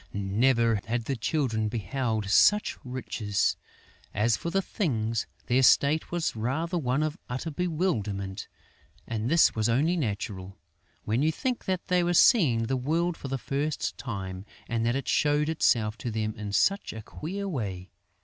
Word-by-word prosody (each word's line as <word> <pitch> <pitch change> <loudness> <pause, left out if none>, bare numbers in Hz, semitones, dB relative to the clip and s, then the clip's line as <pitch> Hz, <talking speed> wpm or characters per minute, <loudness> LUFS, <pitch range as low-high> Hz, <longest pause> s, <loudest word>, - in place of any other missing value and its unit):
Never 115 +3 +2
had 115 0 -2
the 135 - -1
Children 115 -2 0
beheld 110 0 -2
such 210 - +4
riches! 120 -6 -1 0.6
As 110 +3 +3
for 170 - -4
the 195 +3 +1
Things, 115 - -1 0.2
their 125 +2 +3
state 145 +4 +4
was 170 -6 -1
rather 145 +11 -2
one 135 +1 0
of 155 +2 -3
utter 130 +6 -3
bewilderment; 110 - -2 0.6
and 115 +1 -2
this 170 0 +5
was 110 0 0
only 150 +9 +2
natural, 100 - -4 0.5
when 110 +4 0
you 155 +2 +3
think 250 - -3
that 185 -1 -2
they 180 -1 +2
were 175 0 +1
seeing 150 - +5
the 130 +3 -1
world 165 +7 0
for 140 - -8
the 135 0 -2
first 140 +4 -2
time 95 -5 -5 0.2
and 115 -1 -1
that 120 - +1
it 135 - -3
showed 150 +1 +2
itself 115 -8 +1
to 120 - -3
them 110 -1 -2
in 105 -1 -5
such 195 - +1
a 110 -1 -8
queer 195 - -5
way. 95 - -4
125 Hz, 160 wpm, -27 LUFS, 110-160 Hz, 0.6 s, this